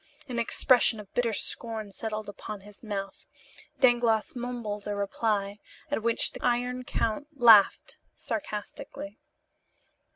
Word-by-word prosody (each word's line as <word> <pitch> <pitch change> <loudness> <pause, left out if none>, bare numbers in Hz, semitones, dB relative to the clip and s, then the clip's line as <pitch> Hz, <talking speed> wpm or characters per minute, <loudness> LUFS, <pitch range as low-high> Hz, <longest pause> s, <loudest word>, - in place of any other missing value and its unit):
An 245 -3 -3
expression 235 -1 +3
of 205 -2 -12
bitter 240 -2 +1
scorn 220 -1 -3
settled 215 +1 -4
upon 205 0 -7
his 205 +1 -14
mouth, 195 -3 -5 0.5
Dangloss 240 +2 +3
mumbled 235 -4 -4
a 205 - -2
reply, 200 0 -1 0.3
at 290 - 0
which 230 +1 +1
the - - -10
Iron 245 +1 0
Count 235 +3 -2
laughed 225 -4 +6 0.2
sarcastically. 210 -3 -6
220 Hz, 120 wpm, -28 LUFS, 205-240 Hz, 0.5 s, laughed